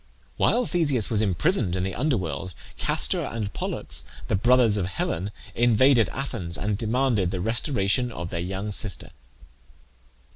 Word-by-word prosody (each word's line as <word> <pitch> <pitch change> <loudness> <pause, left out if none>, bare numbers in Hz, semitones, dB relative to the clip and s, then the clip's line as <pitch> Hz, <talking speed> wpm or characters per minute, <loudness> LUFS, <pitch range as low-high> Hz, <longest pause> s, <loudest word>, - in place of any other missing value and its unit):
While 245 0 +2
Theseus 145 - 0
was 110 -2 +2
imprisoned 105 - +1
in 90 - -1
the 95 0 -3
under 135 +1 0
world 85 0 -5 0.2
Castor - - 0
and 110 -3 -4
Pollux, - - -3 0.3
the - - +2
brothers 120 +1 +4
of 95 -3 -1
Helen, 90 0 -2 0.2
invaded 120 +1 +4
Athens, 115 -11 -1
and 105 0 -1
demanded 115 -3 +1
the 95 0 -3
restoration 120 - +1
of 85 -6 -6
their 85 - -3
young 95 +4 -4
sister. 100 0 +3
105 Hz, 145 wpm, -25 LUFS, 95-125 Hz, 0.3 s, brothers